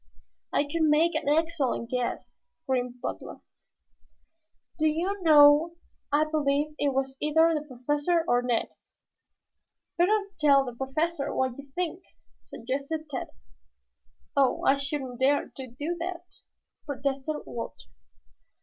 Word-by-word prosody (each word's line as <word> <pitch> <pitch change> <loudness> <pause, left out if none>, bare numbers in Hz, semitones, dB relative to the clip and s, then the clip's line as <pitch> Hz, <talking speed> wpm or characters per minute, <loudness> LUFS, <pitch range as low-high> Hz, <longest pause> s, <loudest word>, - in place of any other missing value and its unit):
"I - - +2
could 295 +3 -3
make 315 +2 +4
an - - -1
excellent 300 -7 0
guess," 250 -1 -3 0.2
grinned 250 -1 -1
Butler. - - -6 1.4
"Do 315 - +3
you 360 +6 -1
know, 305 +1 +6 0.4
I 295 +2 +3
believe 300 -1 0
it 285 - +2
was 265 0 -2
either 320 +2 +4
the 305 - -1
Professor 295 +6 0
or 245 -4 +3
Ned." 245 -2 0 1.3
"Better 390 +5 +4 0.2
tell 280 -3 +5
the 245 - -6
Professor 280 +4 -2
what 260 -2 0
you 280 0 -11
think," 355 0 -2 0.4
suggested 280 +5 -5
Tad. 260 - -3 1.1
"Oh, 275 -2 +2
I 275 - +5
shouldn't 275 -3 -4
dare 280 +2 +2
to 265 -1 -7
do 290 +8 -4
that," 350 0 -5 0.6
protested 275 +1 -2
Walter. 230 - -7
290 Hz, 120 wpm, -27 LUFS, 265-320 Hz, 1.4 s, know